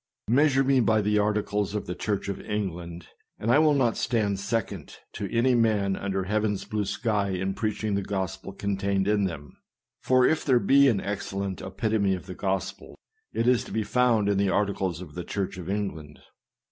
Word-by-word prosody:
Measure 135 +2 +4
me 135 0 +3
by 110 -2 +3
the 105 0 +2
articles 105 -1 0
of 105 - -2
the 90 - -4
Church 100 +1 -2
of 100 - -4
England, 90 -5 -5 0.3
and 115 - 0
I 145 - +6
will 155 -2 +4
not 120 -5 +2
stand 105 -5 0
second 100 -4 -3 0.2
to 100 -2 -5
any 120 +2 +3
man 105 -5 +2
under 95 -1 -2
heaven's 105 +1 -1
blue 105 -1 -2
sky 100 0 -1
in 95 +1 -2
preaching 110 0 -2
the 100 - +1
gospel 95 0 -4
contained 100 0 -1
in 105 -1 +2
them; 75 -6 -6 0.4
for 130 -1 +4
if 160 - +2
there 130 -3 +4
be 140 +3 +5
an 110 -7 +2
excellent 100 -1 -4
epitome 100 0 0
of 90 - -9
the 90 - -7
gospel, 95 +1 -3 0.3
it 115 - -1
is 125 -1 +4
to - - -10
be 110 - 0
found 115 -2 +2
in 100 -1 +2
the 100 -1 +2
articles 95 -3 0
of 80 -5 -10
the 90 - -5
Church 95 -1 -3
of 90 0 -7
England. 95 -7 -4
100 Hz, 190 wpm, -26 LUFS, 95-110 Hz, 0.4 s, I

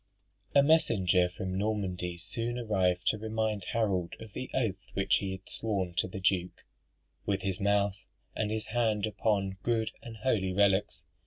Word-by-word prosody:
A 140 - +8
messenger 95 - +4
from 95 +1 -4
Normandy 95 -5 -2
soon 115 +7 -3
arrived 95 -6 +1
to 110 - 0
remind 110 -2 -1
Harold 95 -7 0
of 110 -3 -10
the 130 - -5
oath 100 -7 -1
which 100 - +3
he 95 -1 -3
had 95 0 -8
sworn 100 -5 -1
to - - +2
the 95 - -6
Duke 90 -1 0 0.6
"with 100 -2 0
his 95 0 -1
mouth, 100 -1 +2 0.4
and 110 -1 0
his 110 0 -2
hand 110 -3 +1
upon 100 -3 0
good 115 -1 0
and 115 -2 -9
holy 100 -6 +1
relics." 100 0 +2
100 Hz, 160 wpm, -30 LUFS, 95-110 Hz, 0.6 s, A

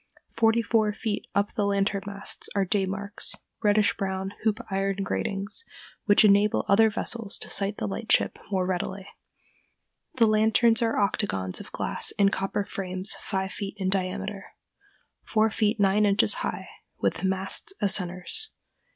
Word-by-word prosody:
Forty 230 0 +3
four 215 -1 +2
feet 215 0 -3
up 200 +1 +1
the 205 -1 0
lantern 200 0 +1
masts 200 0 -4
are 200 -1 +2
day 190 +1 +1
marks, 200 +1 -4 0.3
reddish 210 -1 +3
brown 190 -1 -3
hoop 220 -1 +1
iron 195 0 0
gratings, 195 - -3 0.4
which 205 +1 +6
enable 205 +1 +4
other 220 +3 +5
vessels 225 -1 0
to - - -3
sight 200 +1 +1
the - - -2
lightship 220 +3 +1
more 190 -2 0
readily. 190 +1 -3 1.1
The 235 -3 +5
lanterns 220 +2 +3
are 225 -1 +1
octagons 190 - -1
of - - -10
glass - - 0
in 200 -1 +5
copper 195 +1 -2
frames 185 +1 -1
five 190 -1 -3
feet 200 0 -5
in 190 -1 -1
diameter, 195 +1 -3 0.8
four 220 0 +1
feet 215 0 +1
nine 200 +1 +4
inches 200 0 +3
high, - - -4 0.3
with - - 0
the 190 - -1
masts 190 - -1
as 205 -3 +3
centers. 185 - 0
200 Hz, 150 wpm, -26 LUFS, 195-215 Hz, 1.1 s, which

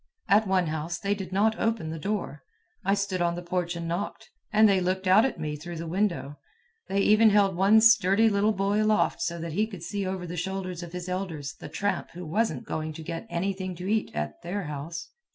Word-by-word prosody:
At 210 +1 +4
one 190 -2 +2
house 160 +2 -3
they 200 +2 0
did 195 -2 -6
not 215 +3 +2
open 225 -9 0
the 165 - -5
door. 185 -6 -3 0.4
I 195 +1 +3
stood 200 -2 -1
on 170 0 +1
the 175 - -6
porch 175 0 -2
and 170 -1 -4
knocked, 200 +5 -4 0.2
and 215 +1 +6
they 195 -2 +4
looked 185 +1 -1
out 190 +5 +6
at 265 - -2
me 150 -1 -3
through 170 +3 -7
the 165 +1 -5
window. 170 -6 -1 0.5
They 195 +2 +1
even 215 +2 +6
held 200 -2 +3
one 200 +4 +5
sturdy 220 -1 +5
little 205 0 +3
boy 200 +1 +1
aloft 215 0 +2
so 170 0 -1
that 165 -1 -5
he 210 +5 +1
could 190 -6 -9
see 200 +2 -3
over 185 -1 -3
the 175 +1 -6
shoulders 185 0 -3
of 175 0 -8
his 180 0 -5
elders 175 -7 -4
the - - -8
tramp 205 0 -2
who 180 0 -7
wasn't 220 +7 -1
going 155 -4 -3
to 160 - -8
get 165 +7 -5
anything 185 +1 -2
to 180 +2 -7
eat 215 +1 +1
at 75 0 -4
their 195 +3 -3
house. 150 +2 -6
185 Hz, 225 wpm, -27 LUFS, 170-205 Hz, 0.5 s, and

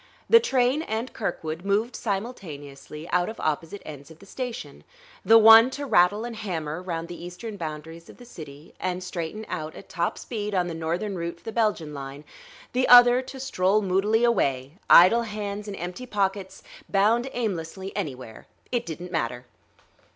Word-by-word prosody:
The 460 - +8
train 265 - +1
and 230 -4 -4
Kirkwood 170 -5 -4
moved 205 +5 0
simultaneously 160 - -6
out 180 +1 +1
of 225 - -8
opposite 160 +5 -3
ends 145 -1 -10
of 160 - -14
the 200 - -16
station, 245 +3 -7 0.4
the 225 - +7
one 225 +2 +9
to 285 +2 -5
rattle 205 -1 +3
and 240 -1 -6
hammer 170 -6 -4
round 170 -2 -4
the 175 0 -9
eastern 180 +5 -7
boundaries 160 -1 -7
of - - -14
the 245 - -13
city 155 -8 -12
and 185 0 -3
straighten 180 +4 -5
out 155 0 -5
at - - -12
top 170 0 -2
speed 210 -3 -4
on 180 -1 +1
the 170 - -4
northern 170 +5 -3
route 170 -1 -4
for - - -26
the 225 - -5
Belgian 210 -10 0
line, 140 +1 -8 0.5
the 255 +1 +1
other 245 0 +8
to 260 +1 -10
stroll 210 -5 +1
moodily 200 +4 +1
away, 140 - 0
idle 190 +7 +8
hands 210 -2 -5
in 205 - -5
empty 180 +9 -6
pockets, 195 -3 -2 0.3
bound 225 +6 +2
aimlessly 190 -4 -4
anywhere 130 - -6 0.2
it 240 -6 -1
didn't 175 +2 -7
matter! 125 -6 -2
190 Hz, 170 wpm, -25 LUFS, 165-225 Hz, 0.5 s, one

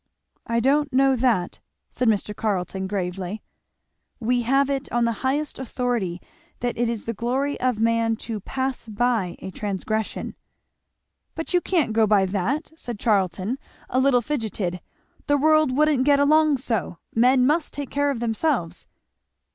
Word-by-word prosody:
"I 230 -1 +1
don't 285 +4 +2
know 270 +1 +4
that," 230 -8 0 0.3
said 250 - -1
Mr. 210 -1 +1
Carleton 190 -2 -2
gravely. 190 +1 -4 0.8
"We 245 +1 +1
have 270 +4 +2
it 275 -1 -3
on 240 0 +2
the 230 - +2
highest 285 +3 -1
authority 240 -8 -2 0.4
that 245 0 -2
it 240 0 0
is 230 -3 -4
the 230 - -2
glory 260 +6 -1
of 250 -3 0
man 230 0 +2
to 225 -2 -4
pass 260 +3 -3
by 220 -4 0
a 190 - -7
transgression." 210 +2 -3 1.0
"But 325 +3 -5
you 355 - +4
can't 325 -13 +1
go 220 -1 +4
by 200 -2 +4
that," 210 - -2
said 240 -8 -6
Charlton 200 +2 0 0.3
a 255 - +2
little 260 -2 +4
fidgeted; 215 -9 -3 0.5
"the 290 -1 +3
world 310 -1 +4
wouldn't 300 -4 +3
get 285 -1 +5
along 305 0 +4
so; 225 -9 -2 0.2
men 250 +2 +4
must 305 +3 +1
take 285 -2 -6
care 285 0 +1
of 275 -5 -2
themselves." 230 - -1
240 Hz, 155 wpm, -24 LUFS, 215-275 Hz, 1.0 s, get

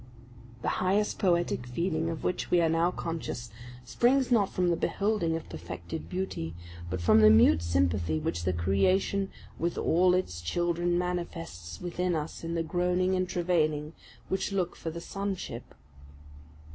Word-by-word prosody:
The - - -2
highest 200 +3 +1
poetic 175 -9 +1
feeling 165 +4 -1
of 165 -2 -5
which 180 - -1
we 175 - +4
are 165 -1 +3
now 165 +2 +3
conscious, 165 -10 -5 0.3
springs 250 - +2
not 210 -5 +4
from 180 -1 +1
the 170 - +3
beholding 195 -2 0
of 165 - -5
perfected 85 - -7
beauty, 180 - -3 0.3
but 90 +1 -2
from 105 +6 +5
the 105 - +8
mute 110 -7 +6
sympathy 85 -1 +1
which 85 +2 -2
the 90 - +1
creation 185 - +1 0.3
with 170 +1 -1
all 180 +2 +3
its 90 - -2
children 175 - 0
manifests 170 - -4
with 175 0 -7
us 170 -4 -1
in 165 0 -3
the 165 - 0
groaning 180 +2 +1
and 185 -1 0
travailing 155 -4 0 0.3
which 190 +2 -1
look 185 -3 -1
for 165 - -5
the 170 +1 -6
sonship. 195 -12 -5
170 Hz, 155 wpm, -29 LUFS, 115-180 Hz, 0.3 s, the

